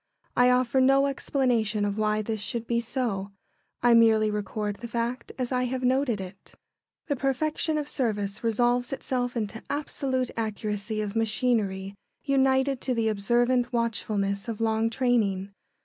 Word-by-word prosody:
I 245 0 +5
offer 250 +1 +3
no 270 +1 +5
explanation 240 -6 0
of 200 -1 -1
why 215 0 +1
this 220 -1 -3
should 230 +3 -3
be 235 0 0
so. 225 -5 -3 0.5
I 240 -1 +6
merely 220 -2 +5
record 210 0 -3
the 235 - -7
fact 235 +1 -3
as 255 -1 -2
I 250 0 +1
have 255 +1 -3
noted 255 -3 +2
it. 190 +1 -10 0.5
The 285 - -1
perfection 305 +4 0
of 295 -1 -2
service 210 -8 -2
resolves 240 +2 +1
itself 250 -2 -2
into 220 0 -3
absolute 265 -3 -2
accuracy 215 -1 -3
of 205 +1 -5
machinery 215 -4 0 0.3
united 265 -1 +2
to 255 -2 -1
the 225 -1 +1
observant 240 +4 +1
watchfulness 205 -4 -1
of 225 -2 -4
long 225 0 +1
training. 220 -6 +1
235 Hz, 150 wpm, -27 LUFS, 210-255 Hz, 0.5 s, I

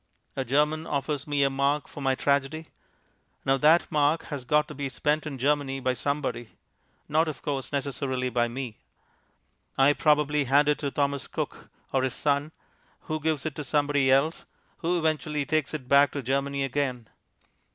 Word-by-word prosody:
A 135 - -1
German 150 +5 +1
offers 145 0 -2
me 145 -1 +1
a 135 - +3
mark 140 +2 0
for 145 - -9
my 135 -1 +2
tragedy. 140 +4 0 0.8
Now 135 0 +3
that 155 +5 +5
mark 150 +1 +2
has 135 -3 -5
got 150 +4 +2
to - - -7
be 140 -1 -4
spent 150 +4 0
in 140 -3 -5
Germany 135 0 0
by 130 -1 0
somebody; 125 -4 -3 0.5
not, 155 +2 +2
of 155 -4 -6
course, 140 -3 -3
necessarily 130 -2 -2
by 120 0 +2
me. 120 -2 -6 1.0
I 135 +2 +5
probably 150 -1 +2
hand 140 +3 +4
it 150 - +2
to 145 - -2
Thomas 140 0 -1
Cook - - -5 0.2
or 135 - +3
his 130 -1 -1
Son, 145 +1 0 0.5
who 155 -1 -3
gives 155 -2 -1
it 155 - -2
to 150 - -3
somebody 145 -1 +2
else, 140 +5 +2 0.3
who 175 +1 0
eventually 155 -2 -1
takes 155 -1 0
it 145 -5 -6
back 140 +1 +5
to 140 - -4
Germany 140 +2 -1
again. 130 -4 -2
140 Hz, 170 wpm, -27 LUFS, 135-150 Hz, 1.0 s, that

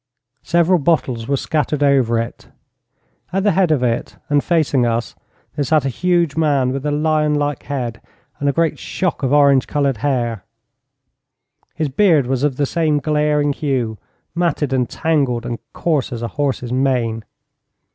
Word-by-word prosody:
Several 170 +1 +2
bottles 135 -7 0
were 140 - +1
scattered 150 0 -1
over 130 -5 +3
it. 115 0 -5 0.8
At 190 +1 0
the 205 - +3
head 185 -1 +2
of 145 -5 +2
it, 115 -2 -1
and 145 -1 +2
facing 155 -7 +2
us, 115 -1 -1 0.4
there 145 - 0
sat 150 0 +2
a - - +1
huge 170 +1 +1
man 145 -5 +2
with 135 +2 -3
a - - 0
lion 150 0 +1
like 145 -1 -1
head 125 -5 -4 0.4
and 145 - +1
a - - +3
great 165 +2 0
shock 180 -5 -2
of 135 -2 0
orange 140 -3 +4
coloured 140 -4 0
hair. 120 -5 -1 1.3
His 155 -3 -1
beard 155 -1 +3
was 130 0 -1
of 145 -3 +1
the 145 - 0
same 155 0 +1
glaring 150 -1 +1
hue; 125 -7 -2 0.3
matted 165 -5 0
and 125 -2 0
tangled 140 -7 0
and 120 -1 -4
coarse 155 -6 -1
as 120 -1 -5
a 115 - -2
horse's 135 -4 -2
mane. 125 -4 0
145 Hz, 165 wpm, -19 LUFS, 125-155 Hz, 1.3 s, orange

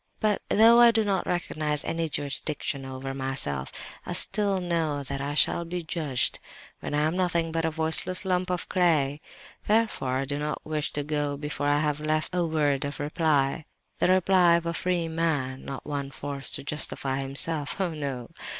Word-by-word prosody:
"But 210 -2 +1
though 230 +2 +7
I 240 0 +9
do 225 -1 +3
not 195 -3 0
recognize 155 -4 -1
any 165 -1 -1
jurisdiction 145 -1 -3
over 135 0 -5
myself, 130 - -2 0.4
still 205 -2 +2
I - - 0
know 165 -5 -1
that 140 +1 -4
I 145 +1 -3
shall 170 - +3
be 175 +1 -4
judged, 155 -6 -1 0.4
when - - -4
I 150 - +2
am 155 +3 +1
nothing 170 -3 +1
but 165 0 0
a - - +2
voiceless 160 +4 -1
lump 185 -1 0
of 180 -1 -2
clay; 150 -5 +2 0.4
therefore 210 - +1
I 135 - -1
do 145 +1 -3
not 150 0 -3
wish 155 -1 -1
to 145 - -1
go 145 -1 -1
before 145 0 -3
I 145 0 +3
have 150 -1 0
left 155 +2 -1
a 180 -1 +2
word 150 -4 +1
of 145 0 -5
reply—the 150 -1 -1
reply 185 -1 +5
of 170 0 0
a 170 - -1
free 175 -1 0
man—not 140 -5 -2
one 140 -2 -3
forced 140 0 -2
to - - -5
justify 140 -2 -1
himself—oh 150 +5 0
no! 135 -5 -4
155 Hz, 175 wpm, -27 LUFS, 140-175 Hz, 0.4 s, I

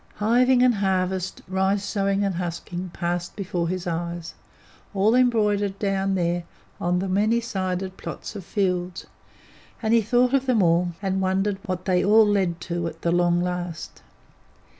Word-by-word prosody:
Hiving 245 +4 +3
and 250 -1 +5
harvest, 190 -2 -1
rice 190 +2 +1
sowing 200 0 0
and 195 -1 0
husking, 175 +1 -4
passed 175 0 -3
before 180 -4 -2
his 185 0 -3
eyes, 170 0 -4 0.6
all 200 +3 +3
embroidered 210 -5 +2
down 195 -1 0
there 175 -1 0 0.4
on 175 +1 +1
the 190 +2 -1
many 210 +5 +2
sided 190 -4 -3
plots - - -7
of 200 - -6
fields, 180 -2 -2 0.7
and 220 -1 0
he 230 - +5
thought 245 +4 +2
of 270 -1 +2
them 230 -6 +3
all, 175 +1 +2
and 190 0 0
wondered 195 +1 0
what 185 -1 -3
they 180 -2 +2
all 215 +2 +6
led 190 -5 +1
to 170 0 -3
at 165 0 -9
the 170 - +1
long 175 0 +2
last. 180 -2 -4
190 Hz, 160 wpm, -24 LUFS, 175-205 Hz, 0.7 s, all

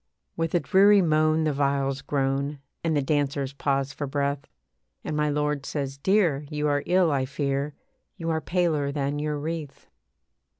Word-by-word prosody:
With 165 +1 -1
a - - +5
dreary 200 +2 +5
moan 155 0 +3
the 155 -1 +1
viols 140 -1 0
groan, 140 +1 -1 0.3
And 160 -2 +1
the 145 - +1
dancers 140 -1 0
pause 135 -1 -1
for 145 - -4
breath, 140 0 -2 0.6
And 155 - -3
my 150 0 +1
lord 150 -1 0
says, 140 -1 -4
'Dear, 165 -6 +2
you 150 -1 -1
are 145 -1 +1
ill, 180 -2 +3
I 135 -2 +1
fear, 140 +1 -2 0.4
You 165 -2 -2
are 160 0 0
paler 160 -6 0
than 140 0 -2
your 150 0 -2
wreath.' 155 -1 -6
145 Hz, 165 wpm, -26 LUFS, 140-155 Hz, 0.6 s, a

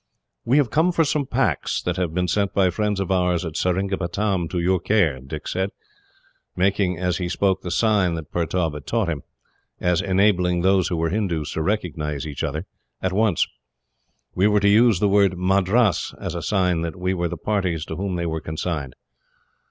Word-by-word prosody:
"We 125 +5 +3
have 135 -7 +2
come 165 +4 +3
for 165 -1 +2
some 145 -2 0
packs, 125 -1 0
that 90 0 -2
have 90 -3 -1
been 90 +2 -1
sent 100 +1 0
by 95 -2 +3
friends 105 +1 -1
of 95 0 -2
ours 90 -2 +1
at 80 -2 -6
Seringapatam 95 0 -1
to 90 - -3
your 90 +2 +2
care," 85 -12 +2
Dick 70 +4 -7
said, 95 +1 -1 0.9
making 95 -1 +1
as 90 -1 -1
he 90 -2 -3
spoke 95 +2 +1
the 90 - -5
sign 95 -2 +2
that 80 -2 -7
Pertaub 85 -1 -1
had 75 -1 -9
taught 115 -6 0
him, 80 -4 -3 0.6
as 90 -2 +1
enabling 95 -2 +2
those 95 -1 +3
who 90 -3 -2
were 80 0 0
Hindoos 90 -7 -1
to 80 - -2
recognise 80 -6 -2
each 75 -1 -5
other, 80 +3 -3 0.3
at 95 -1 -1
once. 105 -3 +2 0.9
"We 95 +3 +3
were 105 0 +3
to 100 - +3
use 110 -2 +5
the 105 - +3
word 100 -2 +3
'Madras' 95 +2 +2
as - - -4
a - - -4
sign 90 -4 +1
that 85 -1 -3
we 90 +1 -1
were 85 -2 -1
the - - -5
parties 95 -7 -1
to - - -6
whom 95 -1 -3
they 85 -1 -2
were 80 -1 -2
consigned." 80 -4 -4
90 Hz, 195 wpm, -23 LUFS, 85-100 Hz, 0.9 s, use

